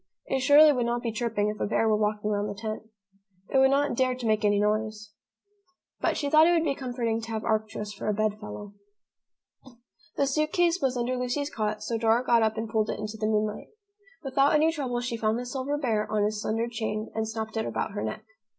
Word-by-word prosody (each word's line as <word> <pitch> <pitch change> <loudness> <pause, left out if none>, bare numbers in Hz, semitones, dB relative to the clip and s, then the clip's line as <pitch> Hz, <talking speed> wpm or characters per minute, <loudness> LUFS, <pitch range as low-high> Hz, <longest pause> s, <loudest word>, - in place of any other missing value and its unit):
It 270 - -1
surely 290 +3 +7
would 245 -3 0
not 240 0 -1
be 230 - -1
chirping 220 -2 -1
if 210 -1 -5
a - - 0
bear 225 +1 +1
were 215 - +3
walking 210 0 -1
round 205 0 -1
the 205 -1 -7
tent. 220 0 -5 0.6
It 270 - +5
would 265 0 +6
not 285 +1 +2
dare 255 0 +1
to 250 -1 -7
make 215 -1 +1
any 205 -1 +3
noise. 215 0 -1 0.9
But - - 0
she 285 - -1
thought 310 +3 +6
it 350 - +4
would 330 -2 +2
be 290 -4 +1
comforting 240 -4 -2
to 225 - -8
have 220 -1 -3
Arcturus 215 -1 -2
for 200 - -6
a 210 - +2
bed 215 0 0
fellow. 205 -1 -8 1.4
The 280 - +3
suit 305 +3 0
case 350 -1 +2
was 255 -2 0
under 245 +1 -1
Lucy's 250 +4 -2
cot, 215 -1 -2
so 230 +1 -2
Dora 230 +2 +2
got 235 -2 +4
up 220 0 +1
and 225 +1 -2
pulled 220 0 0
it - - -2
into 215 +1 -5
the 215 - 0
moonlight. 215 -1 -1 0.6
Without 275 +2 +3
any 315 +2 +4
trouble 260 -6 -2
she 240 -1 -3
found 220 0 0
the 245 - -4
silver 265 +3 -2
bear 225 -7 -1
on 210 -1 +1
his 210 0 -1
slender 225 +2 -1
chain 220 -2 -4
and 220 0 -2
snapped 220 0 -5
it 220 - -1
about - - -2
her 205 0 -4
neck. - - -4
225 Hz, 230 wpm, -27 LUFS, 215-260 Hz, 1.4 s, surely